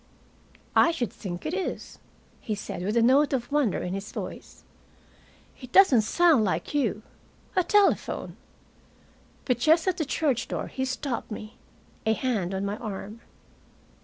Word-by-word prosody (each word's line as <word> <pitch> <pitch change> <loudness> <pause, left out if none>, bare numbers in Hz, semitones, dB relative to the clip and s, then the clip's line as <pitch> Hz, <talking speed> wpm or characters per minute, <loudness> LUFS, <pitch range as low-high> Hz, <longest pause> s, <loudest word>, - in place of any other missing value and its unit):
"I - - +6
should 250 -9 -2
think 185 -6 -7
it 310 - -2
is," 380 0 -4 0.4
he 215 - -3
said, 200 - -6
with 205 +5 -1
a 230 - +4
note 275 +4 +4
of 245 -1 -2
wonder 285 -8 +1
in 180 - -3
his 195 +2 -5
voice. - - -8 1.0
"It 255 -1 -10
doesn't 335 - +6
sound 315 +2 +4
like 195 - -2
you. 230 -7 0 0.5
A 365 - +3
telephone!" 410 +2 +1 1.1
But 250 -3 +1
just 320 +6 +4
at 370 -1 +1
the 315 - -1
church 280 -4 0
door - - -4
he 260 - -3
stopped 260 -1 -3
me, 215 0 -8 0.5
a 220 - +2
hand 215 -7 -1
on 195 +1 -2
my 200 +1 -3
arm. 215 +1 -7
245 Hz, 155 wpm, -26 LUFS, 215-295 Hz, 1.1 s, I